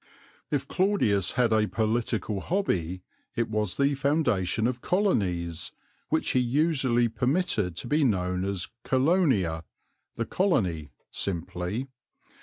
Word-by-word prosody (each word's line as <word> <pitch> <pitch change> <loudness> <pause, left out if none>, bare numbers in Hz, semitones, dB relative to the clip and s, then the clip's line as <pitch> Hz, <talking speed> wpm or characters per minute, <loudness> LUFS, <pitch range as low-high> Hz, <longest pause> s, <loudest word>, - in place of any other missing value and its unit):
If - - -1
Claudius 180 - +2
had 120 -3 +2
a 110 -1 +3
political 110 -2 -1
hobby 95 - -1 0.3
it 115 -1 -1
was 105 -3 0
the 140 +1 +3
foundation 130 - +1
of 125 0 -1
colonies, 90 - 0 0.4
which - - +1
he 130 - +3
usually 130 -2 +2
permitted 115 - 0
to - - -5
be 150 +4 +2
known 90 -6 +1
as 95 -4 -2
Colonia, 130 - +2 0.5
"the 115 - -2
Colony," 95 - 0 0.2
simply. 90 +5 -3
115 Hz, 115 wpm, -27 LUFS, 90-140 Hz, 0.5 s, a